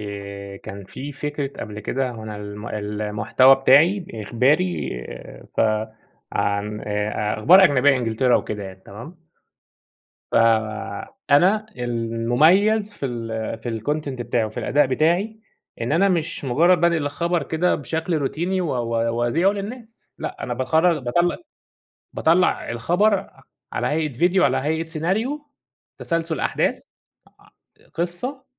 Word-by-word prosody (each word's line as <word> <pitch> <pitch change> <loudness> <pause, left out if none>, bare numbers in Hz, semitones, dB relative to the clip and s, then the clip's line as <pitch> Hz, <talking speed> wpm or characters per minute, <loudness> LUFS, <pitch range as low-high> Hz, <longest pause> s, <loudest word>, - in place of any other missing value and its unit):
آآ، 100 -1 -7
كان 100 0 -9
في 140 +9 -8
فكرة 145 0 -4
قبل 105 -1 -6
كده 130 +4 -2
هو 115 -2 -8
أنا 110 -1 -6
الم 105 +2 -7
المحتوى 105 +5 +3
بتاعي 160 +8 +4
إخباري، 110 - +1 0.7
ف - - +2 0.7
عن 100 +1 -1
آآ، 105 0 -2
أخبار 185 - +7
أجنبية، 140 -3 +4
إنجلترا 120 +1 +2
وكده 105 -1 -4
يعني 95 0 -10
تمام، 115 - -10 1.2
ف - - -3 1.0
أنا 190 +9 +4
المميز 125 - +2
في 140 - -4
ال 115 -2 -4
في 115 -1 -4
الcontent 150 +4 -2
بتاعي 120 -3 -1
وفي 110 0 -5
الأداء 145 -1 +2
بتاعي، 175 +11 0 0.4
إن 115 - -1
أنا 195 +4 +4
مش 170 -4 -1
مجرد 165 +7 +3
بانقل 170 -3 +2
الخبر 170 +4 -1
كده 170 +3 +1
بشكل 160 +3 -2
روتيني، 170 +7 -1
و 175 - -1
و 115 -1 -1
وأذيعه 120 +11 +2
للناس، 220 +3 -8
لأ، - - -6
أنا 120 - -3
باخر 160 +6 +2
باطلع 175 +8 +1 0.8
باطلع 170 +3 +2
الخبر 175 - +2
ع 195 - -15 0.3
على - - -1
هيئة 155 -1 -1
فيديو، 175 +8 +2
على 130 -1 +3
هيئة 160 +4 -1
سيناريو، 220 - -2 0.5
تسلسل 165 -2 -2
أحداث - - 0 0.6
ع - - -22 0.4
قصة 210 - -4
140 Hz, 130 wpm, -22 LUFS, 115-175 Hz, 1.2 s, أخبار